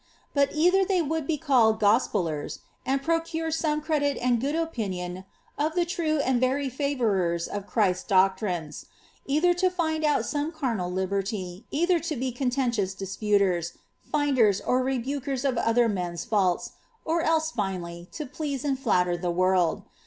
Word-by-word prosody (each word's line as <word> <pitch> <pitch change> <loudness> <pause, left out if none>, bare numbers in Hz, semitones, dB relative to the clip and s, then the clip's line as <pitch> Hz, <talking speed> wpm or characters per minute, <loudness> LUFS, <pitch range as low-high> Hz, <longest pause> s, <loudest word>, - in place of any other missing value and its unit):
But 280 -1 +3
either 360 +5 +4
they 370 -2 +1
would 315 -1 -2
be 320 - 0
called 245 -8 +3
gofpeliers^ 190 - +1 0.3
and 270 +1 +1
pnxrure 330 0 -1
some 305 -1 0
credit 295 -2 0
and 245 -2 +1
good 285 +4 -1
opinion 190 - -3 0.3
of 310 +3 0
the 350 -1 +2
true 330 -3 -1
and 260 -3 +1
very 270 +2 +1
favourers 220 - 0
of 205 -1 -5
Christ's 185 -5 +1
doctrines, 185 -4 +1 0.4
either 310 +6 +3
tu 370 +1 +2
find 320 -3 -1
out 300 -1 +2
some 295 +1 -2
carnal 235 - -2
liberty, 190 +1 -3
cither 345 +3 +2
to 325 -1 -3
be 255 0 -2
contentious 245 -6 -1
clisputer?, 195 -3 0 0.4
finders, 260 -9 +3
or 255 +1 +1
rebukers 270 +1 -2
of 265 - +1
otlier 230 -1 +2
men's 175 -3 -3
&niL<*, 190 -5 +1 0.3
or 330 +1 +1
else, 320 0 +1
finally, 180 - -4
to 305 - -5
please 280 0 -4
and 270 -2 0
flatter 180 -9 +2
the 175 0 -3
world. 180 -1 +2
255 Hz, 155 wpm, -26 LUFS, 190-305 Hz, 0.4 s, either